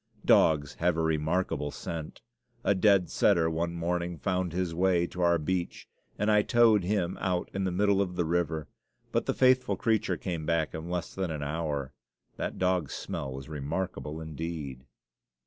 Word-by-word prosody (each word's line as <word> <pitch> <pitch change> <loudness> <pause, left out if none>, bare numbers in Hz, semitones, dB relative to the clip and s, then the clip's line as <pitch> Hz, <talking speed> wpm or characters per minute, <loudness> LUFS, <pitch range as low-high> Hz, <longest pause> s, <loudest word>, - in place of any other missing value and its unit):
Dogs 75 -3 +4
have 85 -1 +2
a 80 - +1
remarkable 80 -1 0
scent. 80 +1 -6 0.4
A - - +3
dead 100 -2 +4
setter 85 -4 +3
one 85 +1 -2
morning 85 0 -2
found 90 +2 -1
his 90 -1 -2
way 90 0 +2
to 90 +1 -6
our 85 -1 +4
beach, 85 +3 -3 0.3
and 105 +1 +2
I 105 0 +5
towed 110 -3 +4
him 90 -2 -1
out 90 -2 -1
in 95 0 -1
the 95 - 0
middle 100 +2 +2
of 90 -2 -2
the 85 - 0
river; 80 -2 -1 0.4
but - - 0
the - - 0
faithful 130 -5 +4
creature 110 -5 +1
came 85 -3 -4
back 80 -1 0
in 80 +2 -6
less 90 -1 -3
than 95 -2 -2
an 75 -2 -3
hour 70 -3 -3 0.4
that - - -3
dog's 90 -5 0
smell 65 - -4
was 65 +1 -7
remarkable 75 +1 -4
indeed. 80 -5 -6
85 Hz, 170 wpm, -29 LUFS, 80-95 Hz, 0.4 s, I